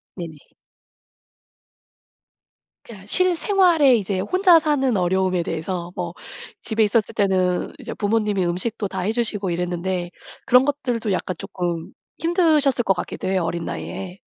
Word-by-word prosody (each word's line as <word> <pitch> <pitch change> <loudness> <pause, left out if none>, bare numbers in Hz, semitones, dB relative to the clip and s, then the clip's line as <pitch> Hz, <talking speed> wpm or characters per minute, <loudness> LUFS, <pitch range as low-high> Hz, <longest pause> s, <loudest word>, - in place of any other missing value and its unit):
네네. 165 -4 -7 2.5
그냥 205 -5 -12
실생활에 355 - +4
이제 195 -2 -2
혼자 365 - +5
사는 280 -6 +1
어려움에 185 -1 +1
대해서 170 +2 -4
뭐 - - -4 0.5
집에 220 0 +1
있었을 210 0 +1
때는 185 -3 +1
이제 - - -6
부모님이 210 -2 0
음식도 200 +5 -2
다 190 0 -5
해 195 +4 0
주시고 215 -5 -1
이랬는데 175 +1 -2 0.3
그런 250 +2 +5
것들도 245 -7 -1
약간 185 - -2
쪼끔 175 -3 -4 0.3
힘드셨을 310 -6 +3
것 195 - +3
같기도 175 - -5
해요. 190 -2 +1
어린 170 0 -3
나이에. 190 0 -6
200 Hz, 295 characters per minute, -22 LUFS, 180-260 Hz, 2.5 s, 혼자